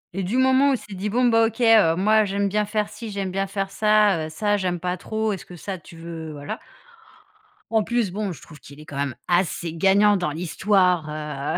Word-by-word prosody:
Et 195 - -1
du 200 +8 -1
moment 260 +2 +4
où - - +3
il - - +1
s'est 210 - -12
dit: 195 +3 -3
«Bon, 250 +4 +2
bah, 225 -1 +4
OK, 230 - -8
heu, 220 -8 +5
moi, 215 +4 +3
j'aime 200 0 -1
bien 210 +2 0
faire 210 0 -1
ci, 230 -2 -8
j'aime 195 -2 -3
bien 195 +1 -1
faire 195 0 -3
ça, 210 -6 +3
heu, - - -9
ça, 205 +6 0
j'aime 180 -3 -2
pas 180 +1 -2
trop. 220 +3 -2
Est-ce 190 - -7
que 180 - -11
ça, 190 +2 -6
tu 165 +1 -15
veux 165 -1 -7
voilà». 145 -1 -6 1.1
En 220 -1 +2
plus, 235 -3 -1
bon, 200 0 -3
je 150 - -10
trouve 150 -3 -14
qu'il 140 +3 -14
est, 155 - -12
quand 145 - -8
même, 140 -3 -2
assez 175 -2 0
gagnant 200 +4 +4
dans 175 -5 -2
l'histoire, 180 0 +1
heu, 150 -2 -4
195 Hz, 235 wpm, -23 LUFS, 165-215 Hz, 1.1 s, heu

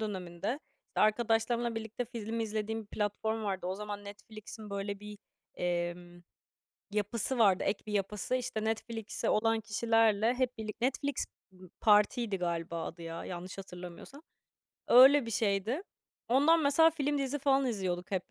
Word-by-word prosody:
döneminde, 195 - -3 0.3
işte, - - -3
arkadaşlarımla 225 +2 +2
birlikte 225 +2 -4
film 230 -1 -4
izlediğim 220 0 -2
bir - - -18
platform 215 +1 -2
vardı. 190 -3 -2
O 185 - -1
zaman 205 0 -6
Netflix'in, 215 +1 -10
böyle 200 0 -4
bir, 210 0 -9 0.4
emm, 175 0 -3 0.7
yapısı 210 +5 -1
vardı, 195 -5 +5
ek 195 - -1
bir 210 - -5
yapısı, 205 +4 -1
işte, 240 -4 -2
Netflix'i 225 0 -2
olan 225 +1 +2
kişilerle 225 +1 +2
hep 250 -1 -1
birlik 220 +1 -6
Netflix, 275 +1 0 0.3
ımm, 185 -1 -15
partiydi 210 0 +4
galiba 170 -1 -2
adı 170 - -8
ya, 165 0 -6
yanlış 180 +2 -7
hatırlamıyorsam. 180 - -9 0.7
Öyle 265 +1 +8
bir 230 - -4
şeydi. 215 - 0 0.5
Ondan 295 +7 +5
mesela 305 +4 +5
film 290 -2 -1
dizi 275 +1 -1
falan 275 -1 +3
izliyorduk 185 -6 -2
hep 185 -2 -2
215 Hz, 145 wpm, -32 LUFS, 195-235 Hz, 0.7 s, Öyle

